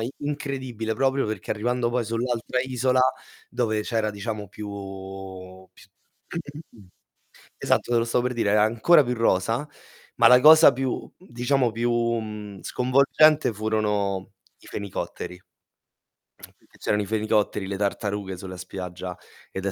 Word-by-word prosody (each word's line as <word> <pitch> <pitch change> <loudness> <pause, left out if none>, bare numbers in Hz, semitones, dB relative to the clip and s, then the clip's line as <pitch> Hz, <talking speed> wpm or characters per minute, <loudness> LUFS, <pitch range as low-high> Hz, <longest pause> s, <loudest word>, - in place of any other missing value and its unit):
i 115 +3 -2
incredibile 130 -6 -3
proprio 135 +2 +1
perché 110 0 -5
arrivando 120 +2 0
poi 125 0 0
sull'altra 115 +2 -2
isola 130 0 +1 0.5
dove 110 -3 0
c'era 110 -1 -1
diciamo 105 -1 -5
più 105 0 -8 1.0
pi - - -18 1.8
esatto, - - 0
te 120 - +4
lo 115 - +3
stavo 120 +1 0
per 125 - -1
dire, 115 -4 0
era 105 - +4
ancora 120 +9 +5
più 125 0 -2
rosa. 115 +5 +1 0.5
Ma - - +7
la 125 - +8
cosa 155 +1 +9
più 130 0 -3
diciamo 125 -6 0
più, 120 +2 -1
mhmm, 110 -4 -2
sconvolgente 140 +3 +3
furono 105 -3 -1 0.3
i - - -18
fenicotteri, 100 -2 -5 1.3
che - - -23
c'erano 105 0 0
i - - -3
fenicotteri, 105 -1 0
le 100 0 -3
tartarughe 100 -1 -2
sulla 95 0 -8
spiaggia, 90 -1 -7 0.4
ed 95 +1 -4
è 100 - 0
115 Hz, 135 wpm, -25 LUFS, 105-125 Hz, 1.8 s, cosa